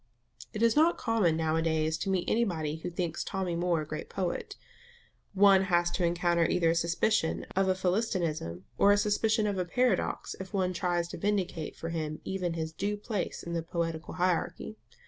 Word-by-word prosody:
It 215 Hz, -, -2 dB
is 230 Hz, -1 st, +4 dB
not 320 Hz, +3 st, +4 dB
common 220 Hz, -9 st, +1 dB
now 160 Hz, -1 st, 0 dB
a 165 Hz, -, +2 dB
days 160 Hz, -1 st, +1 dB
to -, -, -2 dB
meet 185 Hz, -2 st, 0 dB
anybody 165 Hz, -9 st, 0 dB
who 170 Hz, +2 st, -5 dB
thinks 170 Hz, -1 st, -3 dB
Tommy 185 Hz, -3 st, -2 dB
Moore 170 Hz, -1 st, +1 dB
a -, -, -5 dB
great 155 Hz, 0 st, -6 dB
poet; 190 Hz, -, -3 dB, 0.8 s
one 195 Hz, -1 st, +6 dB
has 175 Hz, -2 st, +2 dB
to 180 Hz, -, -1 dB
encounter 170 Hz, 0 st, +2 dB
either 170 Hz, -2 st, +2 dB
a -, -, +2 dB
suspicion 170 Hz, +2 st, +1 dB
of 190 Hz, 0 st, +2 dB
Philistinism 175 Hz, -, -1 dB, 0.2 s
or 200 Hz, -, +6 dB
a 205 Hz, -, +5 dB
suspicion 215 Hz, +1 st, +2 dB
of 190 Hz, -4 st, -1 dB
paradox 250 Hz, +5 st, 0 dB
if 190 Hz, +2 st, -6 dB
one 185 Hz, -1 st, +1 dB
tries 175 Hz, -1 st, 0 dB
to -, -, -7 dB
vindicate 190 Hz, -6 st, -1 dB
for 165 Hz, -, -5 dB
him 155 Hz, -2 st, -3 dB
even 185 Hz, -3 st, -2 dB
his 160 Hz, -1 st, -4 dB
due 205 Hz, +4 st, -2 dB
place 205 Hz, -2 st, -4 dB
in 170 Hz, -, -5 dB
the 170 Hz, -, 0 dB
poetical 165 Hz, 0 st, -3 dB
hierarchy. 180 Hz, +4 st, -1 dB
175 Hz, 185 wpm, -30 LUFS, 165-200 Hz, 0.8 s, one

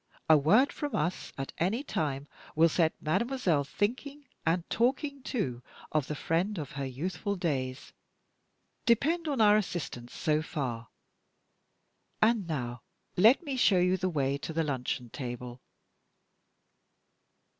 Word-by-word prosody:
A 160 Hz, -, +8 dB
word 200 Hz, -, +4 dB
from 290 Hz, -2 st, -3 dB
us 150 Hz, -3 st, -1 dB
at 135 Hz, 0 st, -5 dB
any 210 Hz, -, +1 dB
time 145 Hz, -, -2 dB, 0.3 s
will 165 Hz, +2 st, +5 dB
set 160 Hz, -1 st, +1 dB
mademoiselle 180 Hz, -, +1 dB
thinking, 260 Hz, -, -3 dB, 0.2 s
and 170 Hz, +1 st, +1 dB
talking 275 Hz, +4 st, 0 dB
too, 135 Hz, -, -2 dB, 0.3 s
of 155 Hz, -3 st, +1 dB
the 150 Hz, -, -3 dB
friend 175 Hz, +8 st, 0 dB
of 145 Hz, -4 st, -5 dB
her 140 Hz, -1 st, -3 dB
youthful 170 Hz, +9 st, -3 dB
days. 135 Hz, -8 st, -3 dB, 0.9 s
Depend 315 Hz, +9 st, +3 dB
on 280 Hz, -4 st, -1 dB
our 210 Hz, -1 st, +7 dB
assistance 150 Hz, -, -4 dB
so 155 Hz, 0 st, +1 dB
far. 125 Hz, -7 st, -4 dB, 1.3 s
And 220 Hz, -4 st, +3 dB
now 125 Hz, -6 st, -3 dB, 0.3 s
let 225 Hz, -, +6 dB
me 280 Hz, -4 st, -3 dB
show 210 Hz, -6 st, +4 dB
you 180 Hz, +1 st, +3 dB
the 185 Hz, 0 st, -1 dB
way 140 Hz, -4 st, 0 dB
to 150 Hz, -, -5 dB
the 165 Hz, +1 st, +1 dB
luncheon 125 Hz, -4 st, -3 dB
table." 125 Hz, -1 st, -6 dB
165 Hz, 135 wpm, -30 LUFS, 140-220 Hz, 1.3 s, A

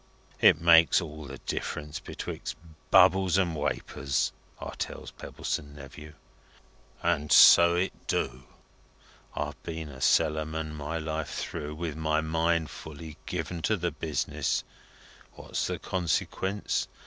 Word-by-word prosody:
It 80 Hz, -, +6 dB
makes 85 Hz, -1 st, +6 dB
all 75 Hz, -3 st, -7 dB
the 70 Hz, 0 st, -8 dB
difference 75 Hz, +3 st, -4 dB
betwixt -, -, -6 dB, 0.3 s
bubbles 95 Hz, 0 st, +5 dB
and 90 Hz, -4 st, +1 dB
wapours,' 70 Hz, -2 st, -1 dB, 0.3 s
I -, -, -6 dB
tells -, -, -6 dB
Pebbleson 75 Hz, 0 st, -5 dB
Nephew. 75 Hz, +2 st, -11 dB, 0.9 s
And 80 Hz, -3 st, 0 dB
so 85 Hz, 0 st, +8 dB
it 90 Hz, +2 st, -2 dB
do. 65 Hz, +3 st, -2 dB, 0.9 s
I've -, -, -4 dB
been 80 Hz, -2 st, -6 dB
a 65 Hz, -2 st, -11 dB
cellarman 80 Hz, 0 st, +1 dB
my 75 Hz, +2 st, -4 dB
life 80 Hz, -1 st, -4 dB
through, 75 Hz, -2 st, -5 dB
with 80 Hz, -2 st, -4 dB
my 80 Hz, -1 st, 0 dB
mind 80 Hz, 0 st, 0 dB
fully 80 Hz, 0 st, -9 dB
given 85 Hz, -2 st, -4 dB
to 110 Hz, +5 st, +1 dB
the 85 Hz, -1 st, -1 dB
business. 80 Hz, 0 st, -2 dB, 0.7 s
What's -, -, -3 dB
the -, -, -2 dB
consequence? 95 Hz, +2 st, -1 dB
80 Hz, 125 wpm, -28 LUFS, 75-85 Hz, 0.9 s, so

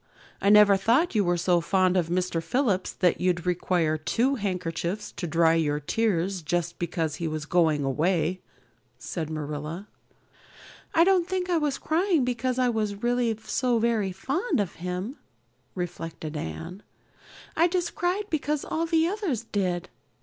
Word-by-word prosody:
"I 200 Hz, -, +3 dB
never 210 Hz, -1 st, +7 dB
thought 240 Hz, -, +2 dB
you 210 Hz, -3 st, +3 dB
were 175 Hz, -1 st, +1 dB
so 175 Hz, 0 st, +2 dB
fond 185 Hz, +1 st, +2 dB
of 175 Hz, -3 st, +2 dB
Mr. 175 Hz, -1 st, 0 dB
Phillips 195 Hz, +1 st, 0 dB
that 180 Hz, -3 st, +1 dB
you'd 180 Hz, -1 st, +1 dB
require 175 Hz, -3 st, +1 dB
two 235 Hz, -, +1 dB
handkerchiefs 185 Hz, -2 st, -3 dB
to 175 Hz, -, -5 dB
dry 165 Hz, 0 st, +3 dB
your 150 Hz, -3 st, +1 dB
tears 190 Hz, +1 st, 0 dB
just 170 Hz, +1 st, -2 dB
because 165 Hz, -3 st, -2 dB
he 170 Hz, -, -2 dB
was 155 Hz, -1 st, -4 dB
going 160 Hz, -3 st, +2 dB
away," 165 Hz, +5 st, 0 dB, 0.6 s
said 155 Hz, +6 st, -5 dB
Marilla. 155 Hz, +4 st, -5 dB, 1.1 s
"I 330 Hz, -, +7 dB
don't 365 Hz, -2 st, +3 dB
think 370 Hz, -1 st, -2 dB
I 340 Hz, -, +3 dB
was 295 Hz, -3 st, 0 dB
crying 330 Hz, -3 st, +1 dB
because 250 Hz, +1 st, -1 dB
I 255 Hz, -1 st, +3 dB
was 215 Hz, -3 st, -2 dB
really 240 Hz, -2 st, +1 dB
so 250 Hz, -2 st, +1 dB
very 225 Hz, -4 st, +1 dB
fond 280 Hz, -, -1 dB
of 200 Hz, -4 st, -1 dB
him," 180 Hz, +9 st, -4 dB, 0.6 s
reflected 165 Hz, -3 st, -5 dB
Anne. 165 Hz, -, -6 dB, 0.7 s
"I 335 Hz, +2 st, +4 dB
just 355 Hz, -1 st, -1 dB
cried 360 Hz, +4 st, 0 dB
because 300 Hz, -1 st, -1 dB
all 330 Hz, +1 st, -1 dB
the 325 Hz, -1 st, +3 dB
others 360 Hz, -, -2 dB
did. 185 Hz, -5 st, -2 dB
190 Hz, 155 wpm, -26 LUFS, 170-250 Hz, 1.1 s, never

